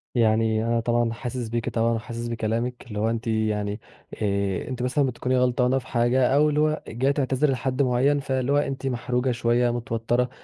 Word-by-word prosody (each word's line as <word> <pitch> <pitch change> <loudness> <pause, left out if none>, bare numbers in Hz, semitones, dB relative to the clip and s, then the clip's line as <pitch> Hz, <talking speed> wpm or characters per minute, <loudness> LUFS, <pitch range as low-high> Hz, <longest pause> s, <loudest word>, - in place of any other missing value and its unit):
يعني 110 -1 +2
أنا 115 0 +1
طبعًا 120 0 +1
حاسس 120 -1 -5
بيكِ 115 0 -2
طبعًا، 115 0 +1
وحاسس 115 +1 -4
بكلامِك، 115 +2 -2
اللي 105 -3 -5
هو 110 +1 +1
أنتِ 115 +1 -3
يعني 105 -1 -1 0.4
آآ، 100 -2 -1
أنتِ 125 -2 -4
مثلًا 135 +3 +1
بتكوني 130 +1 -1
غلطانة 125 +1 +2
في - - -14
حاجة 120 +1 +2
أو 150 +1 +4
اللي 150 0 0
هو 155 0 +1
جاية 130 +5 0
تعتذري 140 0 +1
لحد 130 +1 -1
معين 135 +3 +2
فاللي 130 -1 -1
هو 145 - +4
أنتِ 135 -2 -1
محروجة 125 0 -1
شوية، 120 0 +1
متوترة 120 +1 -1
120 Hz, 185 wpm, -25 LUFS, 115-130 Hz, 0.4 s, أو